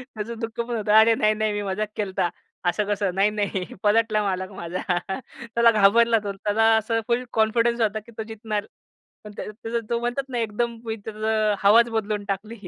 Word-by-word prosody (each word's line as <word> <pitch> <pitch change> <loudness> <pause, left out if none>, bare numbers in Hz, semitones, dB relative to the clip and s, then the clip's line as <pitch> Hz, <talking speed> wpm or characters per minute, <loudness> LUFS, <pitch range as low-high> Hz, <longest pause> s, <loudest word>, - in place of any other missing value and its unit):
त्याचं 220 +2 -5
दुःख 225 -1 -6
पण 235 0 -4
होतं 210 -2 -1
अरे 225 +1 +6
नाही 215 -3 +3
नाही 215 0 -1
मी 205 - -2
मजाक 200 +2 -2
केलता. 190 -4 -1 0.4
असं 175 +4 +1
कसं 205 -2 0
नाही 195 +2 +3
नाही 205 -3 -2 0.2
पलटला 215 0 +3
मालक 185 -1 -2
माझा. 180 -1 -5 0.7
त्याला 235 0 +6
घाबरला 225 +2 +4
तो 200 - -2
त्याला 205 +3 0
असं 225 +1 0
फुल 240 +1 +1
कॉन्फिडन्स 230 +2 +2
होता 215 -1 +1
की - - -14
तो 220 - -3
जितणार. 215 -1 -3 0.6
पण 210 - -9
त्या - - -4
त्याच 230 +2 -4
तो 235 - 0
म्हणतात 245 +3 -3
ना 250 - -3
एकदम 230 +1 -2
मी 220 -1 -2
त्याचं 215 -1 0
हवाच 230 +4 +6
बदलून 215 -2 -2
टाकली. 210 +3 -4
215 Hz, 190 wpm, -24 LUFS, 205-230 Hz, 0.7 s, अरे